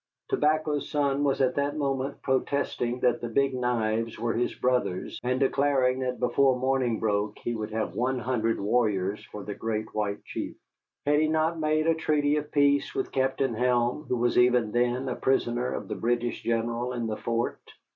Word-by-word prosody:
Tobacco's 150 -1 +1
Son 140 -1 +1
was 140 -1 +1
at 130 -1 +3
that 145 +2 -1
moment 135 -2 -2
protesting 130 -2 -1
that 125 - +2
the 120 - -3
Big 135 +3 +2
Knives 115 -3 -1
were 115 +1 -1
his 120 +1 -1
brothers, 125 -7 -1
and 125 +1 0
declaring 135 -2 +2
that 125 -1 -2
before 130 +1 +3
morning 130 -3 +1
broke 105 -1 0
he 120 - -3
would 110 -1 -4
have 110 0 -2
one 125 +2 0
hundred 120 -2 0
warriors 105 -2 0
for 105 - -8
the 105 - -5
Great 110 0 -3
White 105 -1 -2
Chief. - - -5 0.5
Had 145 +1 +3
he 155 - +3
not 160 +1 +1
made 155 0 +1
a 165 - +4
treaty 150 -2 +1
of 150 0 -4
peace 145 - +2
with 395 -2 -2
Captain 130 -1 0
Helm, 125 +4 +1
who 125 - +1
was 120 +1 +2
even 125 -3 +3
then 125 +2 +1
a 125 - -2
prisoner 125 -2 0
of - - -4
the - - -3
British 120 +1 -1
general 115 +2 -1
in 120 -2 -2
the 110 -1 -3
fort? 115 0 -2
125 Hz, 185 wpm, -27 LUFS, 115-140 Hz, 0.5 s, a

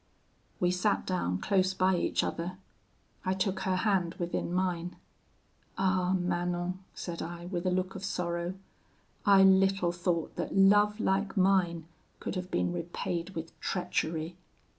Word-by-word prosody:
"We 180 0 +3
sat 185 +3 +1
down 90 - 0
close 190 - +1
by 185 0 +3
each 175 - +1
other. 175 +2 -3 0.7
I 185 0 0
took 190 0 0
her 190 -1 0
hand 185 -3 +1
within 175 0 -2
mine, 180 -1 -1 0.8
'Ah! 185 -1 +2
Manon,' 175 0 -1 0.2
said 170 -2 -5
I, 170 +1 -6
with 180 0 -3
a - - +4
look 185 +1 -1
of 195 - -7
sorrow, 175 -2 -2 0.7
'I 195 -1 +8
little 190 -1 +4
thought 175 -2 -1
that - - -2
love 205 +2 +5
like 195 0 0
mine 185 -4 +3 0.3
could - - -4
have 185 -1 -4
been 175 - 0
repaid 170 +1 -4
with 165 0 -5
treachery! 170 -2 -2
180 Hz, 140 wpm, -30 LUFS, 175-190 Hz, 0.8 s, I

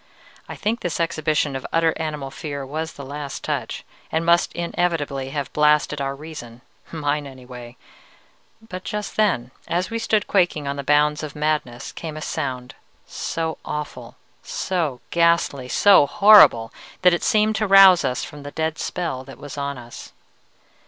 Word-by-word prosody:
I - - -6
think 225 +3 -1
this 175 -2 -3
exhibition 155 -4 0
of 135 - -4
utter 165 -1 +2
animal 150 -4 -4
fear 140 -1 -6
was 160 +4 -4
the 140 - -9
last 145 +1 -6
touch, - - -3 0.3
and 160 +1 0
must 170 0 +3
inevitably 165 -6 -2
have 140 -1 -4
blasted 150 -1 +2
our 135 0 -2
reason 140 -6 -10 0.3
mine 150 -2 -2
anyway; 125 -2 -11 0.9
but 185 -3 -7
just 210 -1 -5
then, 180 - +1 0.2
as 180 +3 -1
we 230 - -2
stood 215 -2 +1
quaking 175 -7 +1
on 140 - -2
the 140 - -5
bounds 150 +1 +2
of 155 -1 -7
madness, 150 -4 -2
came 160 -3 -7
a - - -6
sound, 125 -1 -4 0.3
so 160 -1 -4
awful, 150 0 -6 0.3
so 160 -9 -2
ghastly, 170 -6 +2
so 195 -5 +6
horrible, 145 - +6 0.3
that 180 -1 +6
it 175 - 0
seemed 215 0 +2
to 215 - 0
rouse 195 -2 +8
us 125 - -1
from 145 - -9
the 145 - -7
dead 160 +1 -3
spell 165 -8 -3
that 135 0 -12
was 145 -2 -9
on 140 -1 -3
us. 120 -1 -11
150 Hz, 160 wpm, -22 LUFS, 140-170 Hz, 0.9 s, rouse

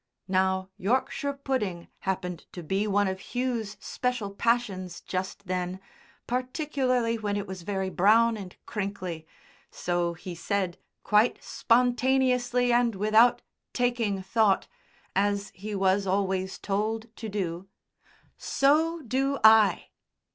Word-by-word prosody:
Now 190 0 +1
Yorkshire 260 +6 0
pudding 250 -11 -3
happened 180 -3 -3
to 175 - -7
be 195 +6 0
one 205 0 +2
of 190 +5 -6
Hugh's 245 -4 -1
special 250 -5 -2
passions 200 -5 -1
just 190 +2 -4
then, 180 0 -2 0.5
particularly 255 -2 0
when 205 -1 -1
it 200 - -3
was 190 -2 -7
very 190 0 -2
brown 225 +5 +4
and 195 -4 -8
crinkly, 185 -6 -4 0.4
so 175 -1 -1
he 180 +2 -7
said 185 +1 -2 0.2
quite 210 +3 +3
spontaneously 250 0 +2
and 240 -2 +3
without 215 +4 +4 0.3
taking 235 -6 0
thought, 200 0 +2 0.5
as 200 0 +1
he 205 +3 -6
was 195 0 +2
always 190 -1 0
told 220 +3 -2
to 225 - -5
do, 185 -3 -3 0.7
"So 315 +4 +2
do 270 +3 0
I!" 220 -4 +6
205 Hz, 120 wpm, -27 LUFS, 190-245 Hz, 0.7 s, I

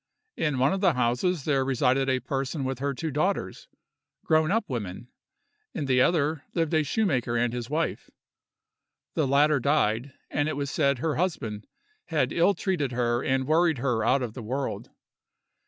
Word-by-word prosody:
In 150 -4 0
one 135 +5 +3
of 195 - -2
the 185 -5 +4
houses 125 +6 0
there 140 -3 +2
resided 135 0 +1
a 130 -1 +2
person 135 +2 -3
with 130 -1 -3
her 140 0 -2
two 160 +3 -3
daughters, 165 +8 -2 0.6
grown 155 -1 +3
up 225 +3 +1
women: 115 -3 -5 0.7
in 150 - -2
the 130 -1 +3
other 155 0 +1
lived 165 -1 0
a 160 - +4
shoemaker 135 - 0
and 120 0 +1
his 120 0 -5
wife. 155 +2 -2 1.0
The 155 - +1
latter 145 +2 +4
died, 130 -2 +1 0.2
and 145 +1 0
it 155 - -3
was 140 -1 -2
said 140 -1 +2
her 155 +4 -1
husband 125 - -2 0.4
had - - 0
ill 175 +4 +3
treated 165 -9 -1
her 120 0 0
and 130 0 0
worried 160 +1 +3
her 120 -3 0
out 130 +3 +2
of 115 -3 -4
the 130 - -7
world. 130 +5 -4
140 Hz, 170 wpm, -27 LUFS, 125-155 Hz, 1.0 s, the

